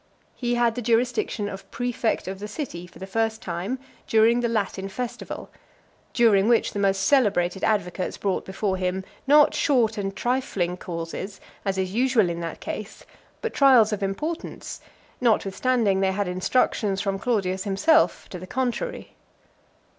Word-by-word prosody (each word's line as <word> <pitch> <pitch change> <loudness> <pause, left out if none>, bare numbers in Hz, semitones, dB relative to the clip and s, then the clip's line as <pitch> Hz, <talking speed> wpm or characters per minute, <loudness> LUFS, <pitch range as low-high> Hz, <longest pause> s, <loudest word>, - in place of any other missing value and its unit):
He 240 -1 -1
had 240 -1 +2
the 245 - -4
jurisdiction 235 -2 0
of 195 -1 -8
praefect 245 -3 -1
of 190 0 -5
the 210 - -5
city, 210 - -6
for - - -16
the 190 - -7
first 225 +3 -1
time, 180 +8 -3 0.3
during 225 +2 +4
the 240 -1 0
Latin 195 -3 -2
festival; 245 +4 -6 0.6
during 220 -5 +4
which 235 - +3
the 205 - -3
most 195 -1 +2
celebrated 195 -9 +2
advocates 185 -4 0
brought 195 -2 -1
before 190 0 -2
him, 185 +1 -1 0.2
not 295 +1 +6
short 235 -8 +2
and 195 -1 -3
trifling 225 -8 -1
causes, 175 +2 -6 0.2
as 195 -1 -1
is 190 0 -1
usual 235 -6 +3
in 170 - -4
that 165 -1 -5
case, 215 0 -7 0.4
but 460 - -2
trials 250 -6 +6
of 205 - -3
importance, 300 - -4 0.4
notwithstanding 220 -1 +2
they 190 0 +2
had 200 0 -1
instructions 195 +2 +1
from 195 -1 -1
Claudius 190 -5 0
himself 310 +12 +3
to 180 - -7
the 185 - -9
contrary. 260 - -3
210 Hz, 155 wpm, -25 LUFS, 190-240 Hz, 0.6 s, not